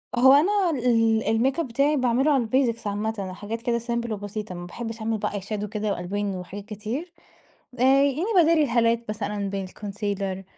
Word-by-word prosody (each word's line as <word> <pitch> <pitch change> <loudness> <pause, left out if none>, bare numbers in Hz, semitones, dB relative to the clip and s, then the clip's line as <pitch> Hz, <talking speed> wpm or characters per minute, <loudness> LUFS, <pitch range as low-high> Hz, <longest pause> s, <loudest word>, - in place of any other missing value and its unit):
هو 260 +2 +7
أنا 370 +5 +4
ال 230 -5 +2
الميك 255 +7 +2
أب 330 - -1
بتاعي 280 +5 +2
باعمل 255 0 +2
له 305 - +4
على 255 -4 +2
الBasics 235 -3 +1
عامةً 205 -2 -3
حاجات 220 +4 -6
كده 240 -1 0
سيمبل 235 -1 -2
وبسيطة، 205 -1 -5
ما 175 0 -7
باحبش 225 +4 -6
أعمل 220 0 -1
بقى 205 -1 -3
Eyeshadow 205 +1 -4
كده 210 0 -2
وألوان 195 +2 -3
وحاجات 190 +3 -7
كتير، 225 - -5 0.7
آآ 245 - 0 0.2
يعني 285 +5 +1
باداري 330 -2 +5
الهالات 235 -2 +2
مثلًا 205 -1 -3
بالكونسيلر 195 0 -4
225 Hz, 170 wpm, -25 LUFS, 205-250 Hz, 0.7 s, هو